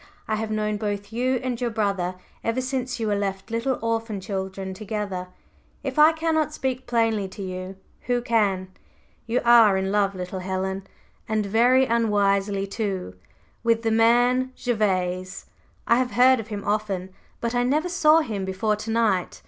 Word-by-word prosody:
I 220 Hz, -, -1 dB
have 220 Hz, 0 st, -3 dB
known 215 Hz, -1 st, -1 dB
both 205 Hz, 0 st, -4 dB
you 255 Hz, +3 st, +1 dB
and 250 Hz, -2 st, -3 dB
your 245 Hz, -, +1 dB
brother 200 Hz, -5 st, -1 dB, 0.3 s
ever 230 Hz, +2 st, 0 dB
since 255 Hz, -1 st, -3 dB
you 225 Hz, -, -1 dB
were 210 Hz, -1 st, +1 dB
left 195 Hz, +1 st, -3 dB
little 240 Hz, +3 st, 0 dB
orphan 225 Hz, -2 st, -1 dB
children 190 Hz, 0 st, -4 dB
together; 205 Hz, -3 st, -4 dB, 0.6 s
if -, -, -2 dB
I 305 Hz, +1 st, +8 dB
cannot 320 Hz, -1 st, 0 dB
speak 260 Hz, -3 st, -3 dB
plainly 225 Hz, -4 st, +1 dB
to 195 Hz, +1 st, -8 dB
you, 185 Hz, 0 st, -6 dB, 0.3 s
who 245 Hz, -1 st, +1 dB
can? 200 Hz, -6 st, +1 dB, 0.6 s
You 235 Hz, +2 st, +1 dB
are 230 Hz, -5 st, +7 dB
in 190 Hz, 0 st, -1 dB
love, 200 Hz, -1 st, +1 dB
little 185 Hz, +1 st, -5 dB
Helen 190 Hz, +1 st, -3 dB, 0.4 s
and 215 Hz, -1 st, 0 dB
very 245 Hz, +6 st, +4 dB
unwisely, 205 Hz, -4 st, +1 dB
too 195 Hz, -, -3 dB, 0.5 s
with 230 Hz, -1 st, +2 dB
the 225 Hz, -, +1 dB
man 245 Hz, +3 st, +3 dB
Gervase. 185 Hz, -6 st, -1 dB, 0.4 s
I 235 Hz, -, +4 dB
have 255 Hz, -1 st, 0 dB
heard 255 Hz, +1 st, +5 dB
of 220 Hz, -, -6 dB
him 205 Hz, -2 st, -5 dB
often, 200 Hz, -3 st, -1 dB, 0.3 s
but 235 Hz, 0 st, -2 dB
I 245 Hz, -, +2 dB
never 295 Hz, +7 st, +1 dB
saw 325 Hz, -3 st, +4 dB
him 215 Hz, -9 st, -3 dB
before 190 Hz, +3 st, 0 dB
to 215 Hz, +1 st, -7 dB
night. 220 Hz, -5 st, +1 dB
215 Hz, 165 wpm, -24 LUFS, 195-240 Hz, 0.6 s, I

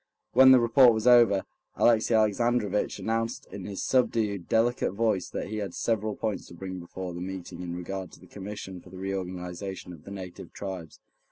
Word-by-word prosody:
When 130 Hz, 0 st, +8 dB
the 130 Hz, -, +8 dB
report 120 Hz, 0 st, +6 dB
was 110 Hz, +1 st, -2 dB
over, 120 Hz, -6 st, +6 dB, 0.3 s
Alexey 115 Hz, 0 st, +3 dB
Alexandrovitch 110 Hz, -1 st, +1 dB
announced 115 Hz, +1 st, -2 dB
in 95 Hz, -3 st, -7 dB
his 100 Hz, -2 st, -4 dB
subdued, 110 Hz, -7 st, +1 dB
delicate 115 Hz, -3 st, +2 dB
voice 105 Hz, -4 st, 0 dB
that -, -, -4 dB
he 110 Hz, -, -4 dB
had 100 Hz, -4 st, -4 dB
several 110 Hz, -2 st, -1 dB
points 110 Hz, -3 st, -3 dB
to 85 Hz, -, -12 dB
bring 95 Hz, +1 st, -6 dB
before 90 Hz, +1 st, -6 dB
the 85 Hz, -, -6 dB
meeting 90 Hz, -1 st, -6 dB
in 85 Hz, -1 st, -5 dB
regard 95 Hz, +1 st, -5 dB
to -, -, -14 dB
the -, -, -16 dB
Commission 95 Hz, -2 st, -8 dB
for 90 Hz, -, -15 dB
the 95 Hz, -, -11 dB
Reorganization 95 Hz, -1 st, -5 dB
of 80 Hz, -3 st, -13 dB
the -, -, -11 dB
Native 95 Hz, -3 st, -8 dB
Tribes. 95 Hz, -6 st, -7 dB
100 Hz, 185 wpm, -28 LUFS, 90-115 Hz, 0.3 s, When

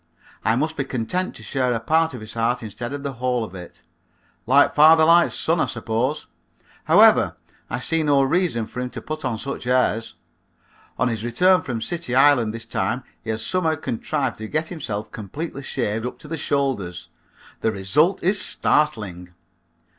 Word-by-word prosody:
I 110 Hz, -, +2 dB
must 155 Hz, +5 st, -1 dB
be 140 Hz, -, 0 dB
content 135 Hz, +9 st, -3 dB
to -, -, -12 dB
share 130 Hz, -2 st, 0 dB
a -, -, -1 dB
part 160 Hz, +4 st, +1 dB
of 120 Hz, -, -8 dB
his 110 Hz, 0 st, -8 dB
heart 115 Hz, +1 st, 0 dB
instead 120 Hz, +3 st, -6 dB
of 145 Hz, 0 st, -5 dB
the 140 Hz, -1 st, -3 dB
whole 125 Hz, -2 st, 0 dB
of 105 Hz, -, -8 dB
it. 90 Hz, -2 st, -11 dB, 0.6 s
Like 140 Hz, +3 st, +5 dB
father 160 Hz, +1 st, +7 dB
like 170 Hz, +1 st, +5 dB
son, 165 Hz, +1 st, 0 dB
I -, -, +2 dB
suppose. 125 Hz, +6 st, -2 dB, 0.6 s
However, -, -, +5 dB, 0.3 s
I -, -, -2 dB
see 165 Hz, +6 st, 0 dB
no 145 Hz, -3 st, +3 dB
reason 135 Hz, -5 st, +1 dB
for 125 Hz, -, -8 dB
him 125 Hz, 0 st, -3 dB
to -, -, -7 dB
put 155 Hz, 0 st, -5 dB
on 125 Hz, -4 st, -1 dB
such 135 Hz, +1 st, -6 dB
airs. 125 Hz, -3 st, +1 dB, 0.8 s
On 125 Hz, -, +1 dB
his 115 Hz, -3 st, -3 dB
return 180 Hz, +10 st, +3 dB
from 120 Hz, -6 st, -4 dB
City 170 Hz, -4 st, -3 dB
Island 130 Hz, -5 st, +5 dB
this 115 Hz, 0 st, -7 dB
time -, -, -2 dB, 0.2 s
he -, -, -8 dB
had 110 Hz, 0 st, -2 dB
somehow 165 Hz, +2 st, +1 dB
contrived 140 Hz, -2 st, -3 dB
to 110 Hz, -, -5 dB
get 155 Hz, +4 st, -2 dB
himself 110 Hz, -, -5 dB
completely 140 Hz, -, -6 dB
shaved 115 Hz, -4 st, -2 dB
up -, -, -7 dB
to -, -, -13 dB
the 165 Hz, -, -3 dB
shoulders. 130 Hz, -, -2 dB, 0.5 s
The 110 Hz, -, +1 dB
result 145 Hz, -, +1 dB
is 190 Hz, +2 st, +3 dB
startling. 100 Hz, -, 0 dB
130 Hz, 180 wpm, -22 LUFS, 115-155 Hz, 0.8 s, father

